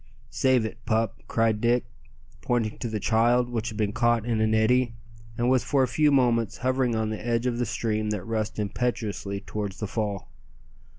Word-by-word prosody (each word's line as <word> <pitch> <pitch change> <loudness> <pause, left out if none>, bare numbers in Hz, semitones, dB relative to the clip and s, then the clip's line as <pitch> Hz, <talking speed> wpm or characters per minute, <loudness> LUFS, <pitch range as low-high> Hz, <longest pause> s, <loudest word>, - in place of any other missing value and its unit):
"Save 125 +1 +2
it, 115 +1 -7
pup," 110 -2 0
cried 115 -2 +1
Dick, 120 +1 +2 0.6
pointing 115 -3 -1
to 120 - -3
the 110 -1 -2
child, 120 +3 +2
which 115 -3 -2
had 110 - -8
been 105 -2 0
caught 120 -1 +2
in 115 -2 0
an 110 0 +2
eddy, 120 +2 +2 0.4
and 120 - +1
was 130 -1 +3
for 140 -2 +2
a - - +2
few 150 +5 +3
moments 120 -5 +2
hovering 130 -2 +1
on 110 -1 -1
the 110 - -5
edge 120 0 0
of 120 -1 0
the 120 - 0
stream 110 -1 -1
that 105 -4 -2
rushed 110 0 -3
impetuously 105 -2 -2
towards 105 -2 -5
the 105 - -3
fall. 105 -2 -3
115 Hz, 190 wpm, -26 LUFS, 110-120 Hz, 0.6 s, was